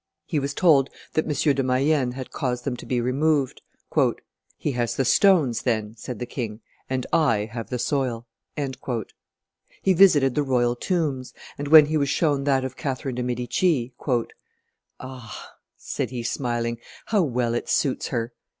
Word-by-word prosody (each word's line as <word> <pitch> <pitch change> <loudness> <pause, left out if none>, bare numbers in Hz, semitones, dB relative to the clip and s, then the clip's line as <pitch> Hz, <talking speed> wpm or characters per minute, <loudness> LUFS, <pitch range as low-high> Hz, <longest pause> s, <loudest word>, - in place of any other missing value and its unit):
He 155 - -1
was 140 +1 -3
told 145 -7 +4 0.2
that 155 - +1
M. 150 -1 +2
de 135 - +1
Mayehne 130 0 +1
had 130 0 -7
caused 125 -2 -2
them 135 -3 -2
to - - -10
be 125 - 0
removed. 135 +3 +1 1.0
"He 150 - -2
has 120 -2 -1
the 135 - 0
stones, 160 - +4
then," 110 -3 -1
said 120 +1 -7
the 125 - -4
king; 115 -3 -5 0.3
"and 130 -1 -1
I 115 -10 +3
have 115 +1 -7
the 125 - -2
soil." 125 -3 -1 1.6
He 190 - +4
visited 155 -8 +5
the 150 - +1
royal 125 -3 +1
tombs, 145 -4 -2 0.2
and 145 - -5
when 155 0 +9
he 155 +1 0
was 140 -2 +1
shown 145 -3 +1
that 135 -2 +2
of 130 0 -5
Catherine 135 -1 -3
de' 125 - -3
Medici, 125 +2 0
" 120 -5 -6
Ah!" 130 -4 -9 0.2
said - - -3
he 125 -2 -5
smiling, 120 -1 -2 0.3
"how 215 -3 +2
well 125 -6 0
it 120 - -3
suits 135 -4 +1
her!" 115 -1 -3
130 Hz, 165 wpm, -24 LUFS, 120-145 Hz, 1.6 s, when